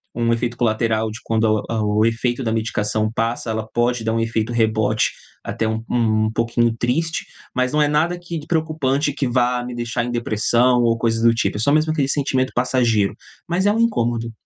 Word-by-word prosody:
um 115 0 +1
efeito 120 +1 -2
colateral 110 -1 0
de 110 - -8
quando 110 -1 +1
a 110 -2 -1
o 105 0 +1
o 110 - +4
efeito 120 +3 0
da 115 - -1
medicação 110 -1 -1
passa, 115 0 -2
ela 110 0 -3
pode 120 0 +1
dar 110 0 0
um 115 - 0
efeito 115 0 -1
rebote 110 -2 +1 0.3
até 110 - -2
um 110 0 -2
um 110 -2 +1
pouquinho 115 0 +1
triste, 160 +7 -1 0.3
mas 125 0 +1
não 150 - +1
é 150 - +4
nada 160 +4 +1
que 175 -1 -6
de 150 - -12
preocupante 155 -3 0
que 140 -1 -1
vá 125 0 +1
me 125 0 -6
deixar 120 0 -2
em 120 - -3
depressão 120 +2 +2
ou 115 -1 +2
coisa 115 0 0
do 115 0 +5
tipo, 115 - -1
é - - -4
só 115 +6 +2
mesmo 155 +1 +2
aquele 145 -4 0
sentimento 130 -2 0
passageiro, 120 -5 +1 0.3
mas 180 +3 0
é - - +5
um 220 - 0
incômodo. 120 - 0
120 Hz, 210 wpm, -20 LUFS, 110-130 Hz, 0.3 s, do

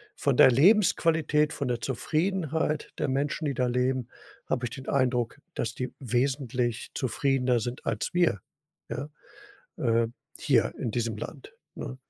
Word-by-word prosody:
von - - +1
der 130 - +8
Lebensqualität, 160 - +4
von 140 - -3
der 120 -1 -1
Zufriedenheit 160 +1 -1
der 145 - -1
Menschen, 140 +4 -1
die 140 - 0
da 125 0 +1
leben, 125 0 0 0.4
habe 125 - -1
ich - - -3
den 130 +1 -9
Eindruck, 125 -4 +1 0.2
dass 115 0 -2
die 125 - -4
wesentlich 125 -2 -1
zufriedener 130 -1 +1
sind 120 +3 -5
als 105 - -2
wir, 175 - +2 0.5
ja, 145 +2 -4 0.7
äh, 115 -2 +2 0.3
hier - - +2
in 115 - -2
diesem 115 -1 -1
Land, 135 +6 -8 0.2
ne? 130 - -6
130 Hz, 145 wpm, -28 LUFS, 120-150 Hz, 0.7 s, der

